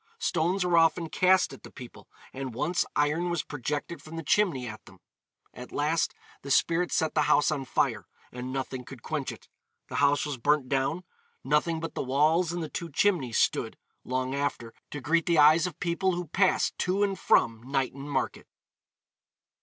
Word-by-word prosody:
Stones 180 - 0
were 175 -2 +4
often 165 0 +2
cast 185 +3 +3
at - - -12
the - - -11
people, 125 -3 -12 0.3
and 130 -3 -6
once 160 +8 0
iron 150 +4 +1
was 170 -3 -1
projected 145 +4 -4
from 155 +1 -10
the 165 - -5
chimney 170 -10 +2
at 110 -1 -8
them. - - -16 0.6
At 125 - -10
last 150 +2 0 0.3
the 140 - -9
spirit 170 +5 +2
set 160 -1 +1
the 155 - +2
house 150 +1 +4
on 140 -3 -2
fire, - - 0 0.2
and 125 +1 -6
nothing 130 -1 -4
could 125 -1 -12
quench 155 -4 -3
it; - - -13 0.4
the - - -4
house 145 +2 +3
was 145 -3 -4
burnt 145 +2 +1
down: 135 +6 -1 0.4
nothing 150 +4 +1
but 165 0 -5
the - - -3
walls 155 +6 +2
and 175 -1 -3
the - - -4
two 170 +2 -5
chimneys 145 - +1
stood, - - +1 0.3
long 130 +1 -2
after, 140 -5 -3 0.2
to 145 - -6
greet 165 +4 +1
the 170 -1 +3
eyes 155 +4 +6
of 175 - -9
people 185 +1 0
who 175 0 -3
passed 185 +4 +1
to 190 +3 +1
and 195 -2 -1
from 115 -1 +3
Knighton 135 +2 -3
market. 140 - -2
150 Hz, 185 wpm, -28 LUFS, 135-170 Hz, 0.6 s, eyes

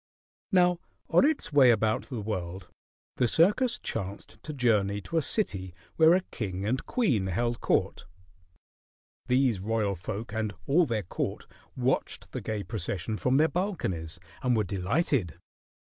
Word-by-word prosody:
Now 180 -2 +4 0.3
on 175 +10 +5
its 295 - 0
way 135 -3 +7
about 110 -1 +2
the 125 -6 -4
world, 95 -3 -4 0.5
the 125 - +3
circus 210 - +3
chanced 100 +1 -5
to 155 - -6
journey 105 -7 +1
to 165 - -3
a - - 0
city 95 - -2 0.2
where 160 +2 +6
a 185 - +2
king 95 -3 -4
and 125 +5 0
queen 125 - +1
held 120 +5 -1
court. - - 0 1.2
These 125 -4 +2
royal 105 0 0
folk 100 +5 -6
and 110 -2 -2
all 160 +4 +3
their 110 -4 -1
court 85 - -4 0.3
watched - - -1
the - - -4
gay 105 -2 -3
procession 105 0 -3
from 125 +4 +1
their 155 +2 +5
balconies 95 - -3 0.2
and 125 -2 +2
were 110 - +2
delighted. 100 - 0
110 Hz, 145 wpm, -28 LUFS, 100-150 Hz, 1.2 s, way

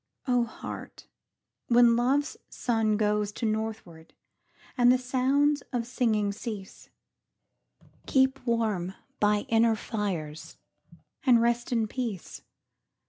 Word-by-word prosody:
O 245 -2 +3
Heart, 225 - -9 0.6
when 235 -1 +6
Love's 270 +5 +1
sun 225 -3 0
goes 210 -1 +1
To 230 - -4
northward, 215 -7 -4 0.6
and 245 -1 +5
the 255 - +4
sounds 270 +3 +1
of 240 -3 -1
singing 225 -4 0
cease, 205 -2 -8 1.2
Keep 265 0 +2
warm 210 -6 0 0.2
by 210 0 +3
inner 225 0 +3
fires, 185 -9 -4 0.7
and 245 -3 +5
rest 235 +1 0
in 230 -3 +1
peace. 225 -6 -5
230 Hz, 105 wpm, -28 LUFS, 210-250 Hz, 1.2 s, when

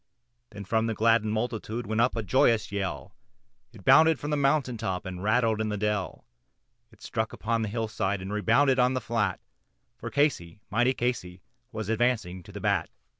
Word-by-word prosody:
Then 100 0 -9
from 110 +3 +1
the 115 - -2
gladdened 110 0 +3
multitude 115 +1 -3
went 110 +2 0
up 120 0 +2
a 115 - -2
joyous 115 +1 +2
yell, 100 -2 -4 0.6
It - - -16
bounded 160 -1 +6
from 145 - -4
the - - +2
mountain 135 -3 +1
top 95 -3 -3
and 90 -1 -6
rattled 110 +1 +2
in 110 - -1
the 105 - -2
dell, 105 -2 -2 0.7
It - - -19
struck 110 0 -3
upon 115 +1 -1
the 110 - -1
hillside, 110 -3 -2
and 95 +2 -6
rebounded 130 +6 +3
on 125 +1 +3
the - - +1
flat, 115 -5 -1 0.6
For - - -5
Casey, 115 - 0
mighty 120 +5 +2
Casey, 95 -8 -3 0.3
was 110 -2 -5
advancing 110 -5 0
to - - -14
the - - -7
bat. - - 0
110 Hz, 180 wpm, -27 LUFS, 100-120 Hz, 0.7 s, bounded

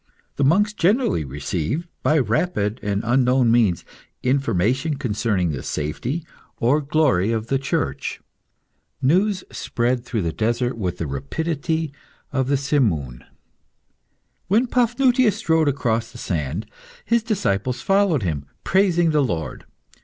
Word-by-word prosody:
The 140 - +1
monks 200 +9 +3
generally 205 - +2
received, 80 - -3
by 155 - +3
rapid 120 - 0
and 100 0 -1
unknown 125 0 +3
means, 110 -7 +2 0.4
information 130 - +1
concerning 105 - 0
the 65 -4 -4
safety 120 - -3 0.3
or 135 +6 +2
glory 140 - +2
of 115 0 -2
the 135 - +2
Church. 135 - -2 0.8
News 185 +8 +2
spread 120 +1 -1
through 115 -5 -2
the 85 -1 -2
desert 120 +3 0
with 90 -5 -3
the 85 - -3
rapidity 155 - -2 0.4
of 130 -2 +1
the 140 0 +2
simoon. 105 - 0 1.2
When 215 +7 +3
Paphnutius 250 -2 +2
strode 160 -1 +2
across 115 -4 0
the 120 - -11
sand, 85 - -3 0.4
his 235 0 +2
disciples 125 - -1
followed 195 - +2
him, 75 -6 -2 0.2
praising 175 -3 +3
the 150 -1 +3
Lord. 85 - -3
130 Hz, 125 wpm, -22 LUFS, 105-160 Hz, 1.2 s, monks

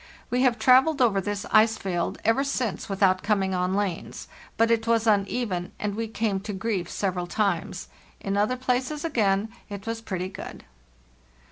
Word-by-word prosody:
We 250 +1 +2
have 250 -3 +3
travelled 260 +6 +5
over 220 -6 +3
this 205 +1 -3
ice 220 +1 +5
field 175 -3 -2
ever 225 +5 +3
since 255 -9 -2
without 190 -1 +2
coming 195 -3 +1
on 180 +1 0
lanes; 200 -4 -3 0.3
but 230 0 +3
it 225 0 +1
was 230 -1 +2
uneven, 200 -3 0
and 210 -1 -2
we 225 +2 -3
came 215 -3 -1
to 205 +2 -6
grief 190 -3 -2
several 180 -3 -2
times. 200 +3 -1 0.3
In 195 0 -2
other 210 +5 +1
places 260 +4 -1
again 215 -8 +1 0.2
it 200 -1 -7
was 225 0 -3
pretty 185 -4 -4
good. - - -9
210 Hz, 165 wpm, -26 LUFS, 195-230 Hz, 0.3 s, travelled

